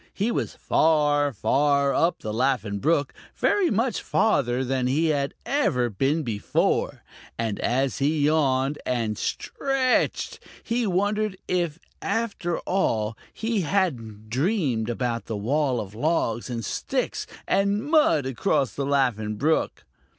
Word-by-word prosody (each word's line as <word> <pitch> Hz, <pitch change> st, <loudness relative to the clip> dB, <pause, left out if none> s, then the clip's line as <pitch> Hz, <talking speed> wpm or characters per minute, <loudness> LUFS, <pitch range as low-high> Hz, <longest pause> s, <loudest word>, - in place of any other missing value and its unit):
He 210 Hz, +4 st, 0 dB
was -, -, -2 dB
far, 145 Hz, -2 st, +2 dB
far 140 Hz, +3 st, +2 dB
up 165 Hz, +6 st, +1 dB
the 110 Hz, -, -4 dB
Laughing 115 Hz, -4 st, 0 dB
Brook, 145 Hz, +1 st, +1 dB, 0.2 s
very 400 Hz, -4 st, +2 dB
much 230 Hz, +2 st, 0 dB
farther 130 Hz, -, +1 dB
than 130 Hz, 0 st, 0 dB
he 155 Hz, +5 st, +2 dB
had 140 Hz, -2 st, 0 dB
ever 125 Hz, -, +1 dB
been 140 Hz, -, 0 dB
before, 110 Hz, -5 st, 0 dB, 0.3 s
and 110 Hz, -3 st, -2 dB
as 130 Hz, +3 st, 0 dB
he 150 Hz, +2 st, +1 dB
yawned 145 Hz, -2 st, +2 dB
and 115 Hz, -4 st, -1 dB
stretched, 270 Hz, -, 0 dB, 0.2 s
he 235 Hz, -1 st, 0 dB
wondered 205 Hz, +2 st, 0 dB
if 170 Hz, -4 st, 0 dB, 0.2 s
after 200 Hz, -5 st, -1 dB
all 110 Hz, -, 0 dB, 0.2 s
he 225 Hz, -2 st, -1 dB
hadn't 120 Hz, -, -2 dB
dreamed 135 Hz, -, 0 dB
about 120 Hz, -2 st, -2 dB
the 110 Hz, -, -3 dB
wall 130 Hz, +4 st, 0 dB
of 100 Hz, -2 st, -6 dB
logs 120 Hz, -3 st, 0 dB
and 115 Hz, -2 st, -4 dB
sticks -, -, -2 dB, 0.2 s
and 200 Hz, +2 st, +1 dB
mud 295 Hz, -, +3 dB
across 130 Hz, +1 st, 0 dB
the 140 Hz, -1 st, -3 dB
Laughing 120 Hz, -7 st, +1 dB
Brook. 155 Hz, +9 st, 0 dB
140 Hz, 130 wpm, -25 LUFS, 120-185 Hz, 0.3 s, mud